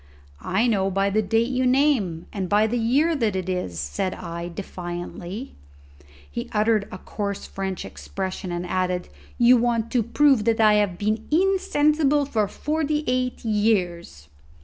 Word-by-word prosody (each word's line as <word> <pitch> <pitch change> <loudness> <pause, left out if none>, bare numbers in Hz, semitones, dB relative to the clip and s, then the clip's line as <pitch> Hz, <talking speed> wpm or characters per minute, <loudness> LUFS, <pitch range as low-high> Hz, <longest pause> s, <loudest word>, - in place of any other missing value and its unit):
"I 195 - +1
know 200 -5 +2
by 195 +1 +1
the 215 +2 +2
date 225 +4 +1
you 255 0 +1
name 250 - +2
and 190 -3 -3
by 210 +1 +4
the 240 +2 -1
year 280 +9 +2
that 225 -7 0
this 190 -1 -2 0.3
is," 85 - -6
said 75 - -2
I 170 +1 -6
defiantly. 175 +5 -6 0.7
He 70 - -6
uttered 215 -1 +2
a - - -6
coarse 200 +1 -5
French 190 -2 -4
expression 190 -1 -5
and 175 +1 -3
added, 180 0 -1 0.3
"You 245 +1 +6
want 230 -1 0
to 245 - +2
prove 245 0 +3
that 225 -1 +2
I 215 -1 +6
have 205 -4 +1
been 215 +3 -1
insensible 305 -5 +2
for 220 -6 0
forty 300 +5 -1
eight 250 -1 -1
years." 185 - 0
215 Hz, 155 wpm, -24 LUFS, 185-250 Hz, 0.7 s, You